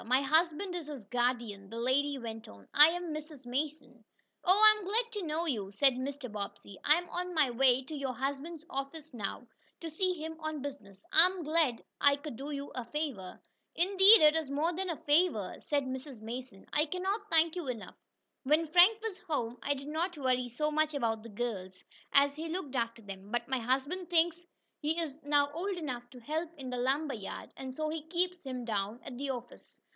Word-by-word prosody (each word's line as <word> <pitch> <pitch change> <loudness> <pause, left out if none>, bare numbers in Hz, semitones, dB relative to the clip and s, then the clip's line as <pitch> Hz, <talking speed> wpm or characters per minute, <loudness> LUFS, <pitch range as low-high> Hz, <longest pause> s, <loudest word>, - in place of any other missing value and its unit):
My 255 +4 +3
husband 330 +5 +2
is 345 -4 -5
his 280 -8 -7
guardian," 235 -4 -1
the 230 - -7
lady 275 +4 +1
went 225 -3 -7
on. 100 -1 -14
"I 295 +1 +9
am 345 -1 -2
Mrs. 305 -3 -8
Mason." 275 -1 -3 0.4
"Oh, 370 +2 +5
I 430 0 +8
am - - -8
glad 455 +5 0
to 420 -3 -4
know 315 +3 -1
you," 215 - -1
said 260 +7 +4
Mr. 265 +1 -4
Bobbsey. 200 -1 -7
"I 300 - +6
am 350 +1 -3
on 360 0 -4
my 290 -5 +4
way 255 +1 +4
to 275 - -9
your 275 -2 -2
husband's 285 +6 -4
office 280 +2 -5
now, 225 +1 -4 0.3
to 330 -1 -6
see 365 +3 0
him 320 0 -6
on 310 -3 -4
business. 200 -9 -8
I 330 +3 +8
am 370 -2 -5
glad 305 -6 +1 0.2
I 285 0 +6
could 290 -2 -7
do 275 +5 -6
you 285 -1 -5
a 250 - -3
favor." 240 -8 -4 0.4
"Indeed 390 +4 +7
it 305 0 +7
is 320 -4 -1
more 305 +5 +1
than 375 +2 -3
a 330 - -2
favor," 295 - +2
said 285 -1 0
Mrs. 260 -1 -6
Mason. 230 -2 -7
"I 300 +1 +3
cannot 385 +5 -2
thank 325 0 +3
you 350 -5 -4
enough. 230 -5 -5 0.5
When 305 +4 +3
Frank 360 +7 +6
was 420 -5 -4
home 245 -9 -3
I 285 - 0
did 275 +1 -8
not 330 +3 -2
worry 255 -3 +1
so 300 +6 -1
much 310 0 +1
about 225 -5 0
the 230 - -10
girls, 200 -5 -4 0.3
as 280 0 +5
he 325 +1 -4
looked 320 -6 -4
after 230 -1 -1
them. 195 0 -9
But 240 +1 -1
my 260 -1 0
husband 275 +9 -1
thinks 345 0 +2 0.3
he 315 +3 0
is 310 -5 -3
now 285 -1 +2
old 370 +4 -2
enough 250 -7 -5
to 250 - -12
help 310 +7 -2
in 260 -3 -6
the 250 - -2
lumber 275 +4 +1
yard, 205 -4 -7
and 265 -1 -6
so 310 +4 -2
he 315 0 -3
keeps 360 +1 -1
him 255 -3 -5
down 210 0 -2
at 255 - -8
the 280 0 -3
office. 245 -2 -7
285 Hz, 210 wpm, -32 LUFS, 245-325 Hz, 0.5 s, I